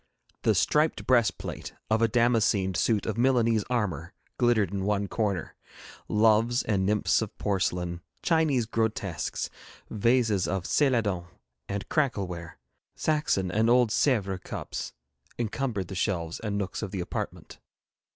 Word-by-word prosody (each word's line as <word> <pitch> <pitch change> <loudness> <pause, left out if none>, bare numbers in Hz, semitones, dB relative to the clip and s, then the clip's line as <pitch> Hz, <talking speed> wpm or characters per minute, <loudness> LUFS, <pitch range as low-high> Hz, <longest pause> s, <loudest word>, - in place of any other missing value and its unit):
The - - +3
striped 155 +1 +2
breastplate 115 - 0 0.2
of 110 +1 +3
a 115 - +5
damascened 110 -5 +2
suit 110 0 +1
of 110 +1 -2
Milanese 115 -4 +3
armour 95 - -2 0.2
glittered 115 -7 +3
in 100 -1 -2
one 100 0 0
corner; 100 -5 -2 0.5
loves 110 +3 +3
and 95 -3 0
nymphs 105 +2 +2
of 110 - -5
porcelain, 90 -3 -1 0.2
Chinese 155 -8 +2
grotesques, 110 -5 -2 0.4
vases 110 -3 +2
of 95 -1 -1
céladon 105 - +1 0.4
and 100 0 -3
crackleware, 95 - -2 0.4
Saxon 150 - 0
and 110 +4 +2
old 120 -2 +4
Sèvres 100 -9 +1
cups - - -5 0.4
encumbered 115 -4 -2
the - - -7
shelves 85 -3 -2
and 105 -2 -3
nooks 100 -2 -3
of 110 - -3
the 95 - -4
apartment. 90 - -5
105 Hz, 130 wpm, -27 LUFS, 95-120 Hz, 0.5 s, a